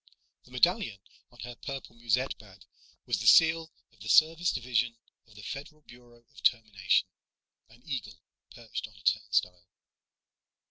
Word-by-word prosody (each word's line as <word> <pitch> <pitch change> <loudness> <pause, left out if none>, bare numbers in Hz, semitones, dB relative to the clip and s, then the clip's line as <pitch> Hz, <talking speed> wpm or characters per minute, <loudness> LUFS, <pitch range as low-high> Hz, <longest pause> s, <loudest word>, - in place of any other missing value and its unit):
The - - -19
medallion 170 - +1 0.3
on 120 - -15
her 120 0 -7
purple 135 -1 -8
musette 120 +3 0
bag 100 -4 -16 0.4
was - - -1
the - - -2
seal 160 0 +6 0.2
of 115 - -27
the 110 - -7
Service 165 +5 +4
Division 120 -1 -1 0.3
of 105 - -21
the 105 - -12
Federal 150 +6 -8
Bureau 120 -3 -18
of - - -14
Termination, 105 -5 +2 0.6
an 120 +2 -21
eagle 115 - -5 0.3
perched 115 -1 -7
on 105 - -20
a 105 - -17
turnstile. 90 -4 0
120 Hz, 145 wpm, -29 LUFS, 105-135 Hz, 0.6 s, seal